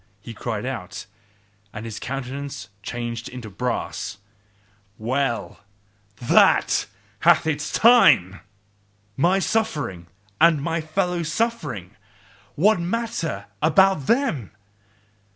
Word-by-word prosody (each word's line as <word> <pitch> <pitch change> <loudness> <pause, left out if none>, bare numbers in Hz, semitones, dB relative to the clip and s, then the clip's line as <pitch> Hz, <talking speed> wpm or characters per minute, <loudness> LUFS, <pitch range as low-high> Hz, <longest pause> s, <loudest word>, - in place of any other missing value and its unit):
he 115 +4 -9
cried 110 -1 -4
out, 100 -8 -5 0.7
and 105 +2 -7
his 115 -2 -6
countenance 135 +1 -5
changed 120 +1 -5
into 120 -4 -9
brass. 105 -2 -3 0.8
"Well! 120 +1 -2 0.6
THAT 115 +2 +3 0.3
hath 170 0 +5
had 160 -1 +1
its 150 +1 -5
time! 220 - +5 0.8
My 175 - +3
suffering 155 - -1 0.3
and 165 -2 +5
my 165 +3 -2
fellow 180 +2 -1
suffering 155 - -2 0.6
what 200 +5 +4
matter 205 -2 -3 0.2
about 165 -1 +4
them! 230 - +1
140 Hz, 100 wpm, -23 LUFS, 115-180 Hz, 0.8 s, hath